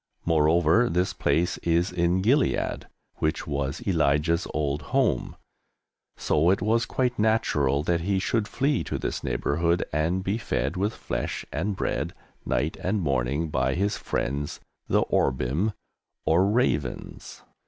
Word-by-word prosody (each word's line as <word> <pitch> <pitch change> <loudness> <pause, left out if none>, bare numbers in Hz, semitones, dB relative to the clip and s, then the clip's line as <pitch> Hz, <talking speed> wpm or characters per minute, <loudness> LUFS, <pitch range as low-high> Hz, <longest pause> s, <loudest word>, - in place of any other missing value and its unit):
Moreover, 85 +7 +3
this 90 +2 0
place 85 +2 0
is 85 +2 +1
in 90 +1 +1
Gilead, 130 +6 +1 0.3
which 80 +1 -1
was 70 0 -3
Elijah's 80 -1 +2
old 75 -1 -1 0.2
home, - - +1 0.8
so 80 +3 +2
it 95 - +3
was 115 +4 +1
quite 125 -2 -1
natural 75 -11 +2
that 85 +1 +1
he 95 +3 0
should 105 +3 0
flee 140 +4 0
to - - -3
this - - -3
neighbourhood 85 +7 0
and 85 +5 0
be 100 +4 -1
fed 70 - -1
with 100 +4 0
flesh - - -4
and 95 +6 -1
bread, - - -2 0.3
night 75 +5 0
and 100 +3 0
morning, 70 0 0
by 65 -2 0
his 100 +3 0
friends 70 +3 -3 0.3
the - - +3
Orbim, 70 - 0 0.5
or 90 +5 +3
"Ravens." 80 - -2
85 Hz, 135 wpm, -26 LUFS, 75-100 Hz, 0.8 s, Moreover